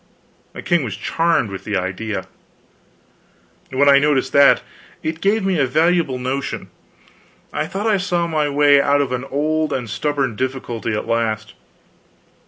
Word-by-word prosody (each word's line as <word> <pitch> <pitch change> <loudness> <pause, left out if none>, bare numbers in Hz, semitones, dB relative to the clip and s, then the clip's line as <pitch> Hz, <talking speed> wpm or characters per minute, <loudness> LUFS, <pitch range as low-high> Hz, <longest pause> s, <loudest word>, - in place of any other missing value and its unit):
The - - -8
king 175 -4 +1
was 110 -6 -4
charmed 165 -10 0
with 95 - -7
the 105 -2 -2
idea. 95 +1 -3 1.4
When 135 +2 +2
I 140 0 +7
noticed 140 -2 +1
that, 140 0 +6 0.4
it 160 +1 -3
gave 200 +1 +1
me 190 -4 +1
a 135 - +2
valuable 160 -1 +2
notion. 130 +2 -4 0.8
I 155 - -2
thought 195 +5 -4
I 215 -2 +3
saw 180 -3 0
my 155 -3 0
way 145 0 +5
out 145 0 +2
of 140 - -2
an 125 +1 -3
old 155 +2 -1
and 125 -4 -2
stubborn 135 +1 -1
difficulty 120 -2 -3
at - - -3
last. 110 -2 -1
140 Hz, 155 wpm, -20 LUFS, 120-155 Hz, 1.4 s, I